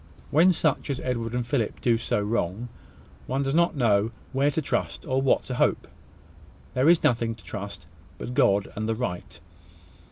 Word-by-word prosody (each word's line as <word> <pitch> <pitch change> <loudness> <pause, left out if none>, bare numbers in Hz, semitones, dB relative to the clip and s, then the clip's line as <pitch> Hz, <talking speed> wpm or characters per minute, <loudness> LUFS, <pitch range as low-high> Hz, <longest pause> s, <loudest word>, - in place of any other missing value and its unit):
When 170 +5 +6
such 155 -5 0
as 135 - -1
Edward 115 -2 -2
and 125 -1 -1
Philip 120 -4 -1
do 120 -2 +2
so 115 -2 -1
wrong, 105 +1 -2 0.6
one 135 +2 0
does 135 0 -1
not 170 +1 +3
know 110 -5 +2 0.2
where 135 +2 +3
to 145 - -1
trust, 90 - -2
or 130 +1 0
what 135 - +2
to 130 - -5
hope. 125 - +1 0.9
There 130 +5 +3
is 170 -1 +5
nothing 115 -1 +1
to 110 - -18
trust, 100 -5 -7 0.3
but 125 - -6
God 100 -7 +3
and 110 +1 -3
the 115 - +1
right. 90 -7 -5
120 Hz, 180 wpm, -26 LUFS, 110-135 Hz, 0.9 s, When